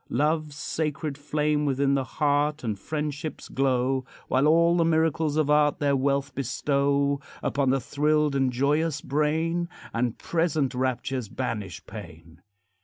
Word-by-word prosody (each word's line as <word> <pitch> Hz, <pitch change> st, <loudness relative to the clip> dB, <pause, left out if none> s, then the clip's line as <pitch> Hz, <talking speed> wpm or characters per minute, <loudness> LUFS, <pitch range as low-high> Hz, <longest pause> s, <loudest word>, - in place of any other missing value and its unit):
Love's 150 Hz, +2 st, 0 dB
sacred 150 Hz, -1 st, -3 dB
flame 150 Hz, +1 st, 0 dB
within 140 Hz, -1 st, +1 dB
the 135 Hz, -1 st, +1 dB
heart 145 Hz, +2 st, 0 dB
And 105 Hz, -4 st, -2 dB
friendship's 150 Hz, -, -4 dB
glow; 130 Hz, 0 st, +1 dB, 0.3 s
While 135 Hz, +3 st, +3 dB
all 170 Hz, +2 st, +5 dB
the 170 Hz, -, +3 dB
miracles 160 Hz, -2 st, +1 dB
of 150 Hz, -2 st, +2 dB
art 150 Hz, 0 st, +4 dB
Their 140 Hz, -1 st, +2 dB
wealth 140 Hz, +1 st, 0 dB
bestow 140 Hz, +2 st, 0 dB, 0.2 s
Upon 140 Hz, -2 st, +1 dB
the 135 Hz, +1 st, +3 dB
thrilled 150 Hz, +3 st, +1 dB
and 135 Hz, -2 st, +2 dB
joyous 145 Hz, +4 st, +1 dB
brain, 160 Hz, +5 st, 0 dB, 0.2 s
And 120 Hz, 0 st, -1 dB
present 155 Hz, -5 st, 0 dB
raptures 125 Hz, -2 st, -2 dB
banish 105 Hz, -7 st, -4 dB
pain. 80 Hz, +1 st, -11 dB
145 Hz, 135 wpm, -26 LUFS, 130-150 Hz, 0.3 s, all